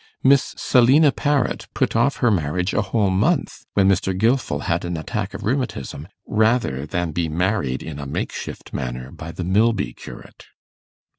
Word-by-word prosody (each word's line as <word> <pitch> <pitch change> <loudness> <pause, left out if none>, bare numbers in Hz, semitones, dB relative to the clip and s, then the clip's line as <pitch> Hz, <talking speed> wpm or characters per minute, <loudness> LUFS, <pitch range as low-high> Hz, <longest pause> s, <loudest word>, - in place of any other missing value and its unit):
Miss 135 0 +4
Selina 135 +5 +5
Parrot 145 -2 0
put - - 0
off 120 +5 +3
her 120 - +5
marriage 90 +1 0
a - - +2
whole 100 -1 +1
month 135 - 0
when 95 -1 +4
Mr. 95 -1 +1
Gilfil 115 - +1
had 85 0 -1
an 85 -1 -3
attack 80 - -4
of - - -7
rheumatism, 120 - -3 0.2
rather 110 - +1
than 85 +1 -2
be 80 +1 -1
married 80 -5 -1
in 75 -3 -7
a 70 - -6
makeshift - - -5
manner 65 -1 -4
by 80 +1 -8
the 90 - -5
Milby 100 - +1
curate. - - -12
95 Hz, 160 wpm, -22 LUFS, 80-120 Hz, 0.2 s, Selina